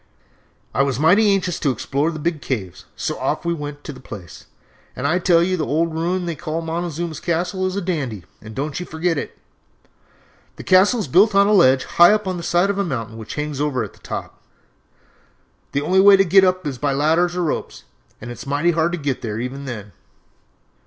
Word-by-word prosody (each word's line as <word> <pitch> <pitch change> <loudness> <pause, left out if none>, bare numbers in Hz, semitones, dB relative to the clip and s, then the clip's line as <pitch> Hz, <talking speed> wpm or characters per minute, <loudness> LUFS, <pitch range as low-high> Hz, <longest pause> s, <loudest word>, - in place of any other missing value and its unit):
"I - - +2
was 135 -2 0
mighty 200 +7 +5
anxious 185 -3 0
to 145 - +1
explore 140 +5 -1
the 165 - -5
big 155 0 -2
caves, 100 -9 -5
so - - -3
off - - -2
we 170 - +1
went 145 -2 -7
to 150 - -7
the 130 - -13
place, 95 - -11 0.5
and 125 - -5
I 175 +5 +2
tell 170 -2 +4
you 185 +1 0
the 160 - -2
old 165 +2 0
ruin 175 +3 -1
they 170 - -2
call 165 +1 -4
'Montezuma's 165 -1 -4
Castle' 180 +3 -1
is 185 - -4
a 200 - -1
dandy, 140 - -3 0.2
and 110 0 -11
don't 145 +3 -3
you 180 - -5
forget 165 -1 -1
it. - - -7 1.2
The - - -9
castle 200 +6 +4
is 195 - -4
built 195 - +4
on 200 0 +6
a 210 - +2
ledge 130 -9 +5
high 175 +4 +5
up 210 -2 -1
on 185 -1 -2
the - - -5
side 175 +3 +2
of 200 - -4
a - - +2
mountain 115 - -4
which 110 -1 -8
hangs 150 -1 -3
over 140 -5 0
at 105 - -8
the - - -21
top. - - -7 1.3
The 140 - -1
only 185 +5 +3
way 200 0 +8
to 195 - +4
get 190 +2 +5
up 185 -1 +1
is 135 -4 -4
by 145 -2 0
ladders 165 +5 +2
or 180 - -1
ropes, 155 - -4 0.4
and 120 +2 -8
it 120 - -9
is - - -9
mighty 145 +5 +1
hard 165 +1 0
to - - -1
get 140 -4 -3
there 110 -2 -4
even 130 +3 -5
then. 105 -6 -7
160 Hz, 220 wpm, -20 LUFS, 140-180 Hz, 1.3 s, way